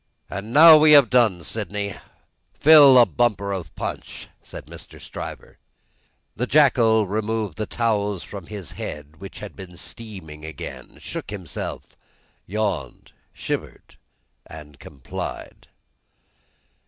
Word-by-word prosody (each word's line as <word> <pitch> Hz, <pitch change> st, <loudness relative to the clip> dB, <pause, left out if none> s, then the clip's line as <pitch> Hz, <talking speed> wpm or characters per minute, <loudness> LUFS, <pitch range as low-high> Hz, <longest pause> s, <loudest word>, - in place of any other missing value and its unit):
"And 100 Hz, +4 st, -6 dB
now 160 Hz, +4 st, +9 dB
we 150 Hz, 0 st, +6 dB
have 140 Hz, -6 st, +6 dB
done, 110 Hz, -9 st, +3 dB
Sydney, 100 Hz, +1 st, -4 dB, 0.6 s
fill 145 Hz, -4 st, +8 dB
a 120 Hz, -, +8 dB
bumper 105 Hz, -6 st, 0 dB
of 95 Hz, -5 st, -6 dB
punch," -, -, -7 dB
said -, -, -11 dB
Mr. -, -, -13 dB
Stryver. -, -, -9 dB, 0.8 s
The 125 Hz, +4 st, -2 dB
jackal 120 Hz, -7 st, +4 dB
removed 110 Hz, -2 st, -3 dB
the 110 Hz, -, -2 dB
towels 105 Hz, -5 st, -1 dB
from 100 Hz, -5 st, -9 dB
his 100 Hz, -5 st, -7 dB
head, 75 Hz, +1 st, -8 dB
which 95 Hz, +2 st, -10 dB
had 105 Hz, -, -9 dB
been 90 Hz, -3 st, -11 dB
steaming 85 Hz, -4 st, -10 dB
again, 80 Hz, -2 st, -9 dB
shook -, -, -7 dB
himself, 95 Hz, -6 st, -7 dB, 0.5 s
yawned, 95 Hz, -, -4 dB, 0.2 s
shivered, -, -, -6 dB, 0.5 s
and 75 Hz, -2 st, -12 dB
complied. 70 Hz, -2 st, -8 dB
105 Hz, 115 wpm, -22 LUFS, 90-115 Hz, 0.8 s, now